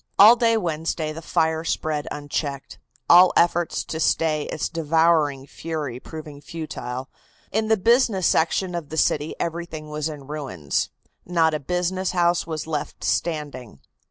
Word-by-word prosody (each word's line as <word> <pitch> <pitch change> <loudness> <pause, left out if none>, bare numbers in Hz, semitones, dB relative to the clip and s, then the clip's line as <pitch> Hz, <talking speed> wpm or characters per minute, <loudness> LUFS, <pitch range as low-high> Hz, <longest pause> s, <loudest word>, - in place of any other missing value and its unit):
All 215 +4 +9
day 230 -2 +3
Wednesday 160 -4 -2
the 165 - -8
fire 160 0 0
spread 155 -2 -2
unchecked, 145 -1 -4 0.3
all 180 +1 +8
efforts 175 0 +2
to 160 - -5
stay 155 -2 +1
its - - -3
devouring 160 -3 +2
fury 150 -5 -5
proving 150 -1 -9
futile. 130 -5 -6 0.4
In 220 +1 0
the 220 0 +3
business 225 -2 +3
section 175 +4 +2
of 170 -4 -5
the 160 - -6
city 150 0 +1
everything 165 -2 -4
was 150 +1 -2
in 145 -3 -8
ruins. 135 - -3 0.3
Not 165 -2 +2
a 155 - -1
business 180 +5 -1
house 175 -1 +2
was 160 -2 -4
left 155 -2 -4
standing. 145 - -2
160 Hz, 145 wpm, -23 LUFS, 150-175 Hz, 0.4 s, All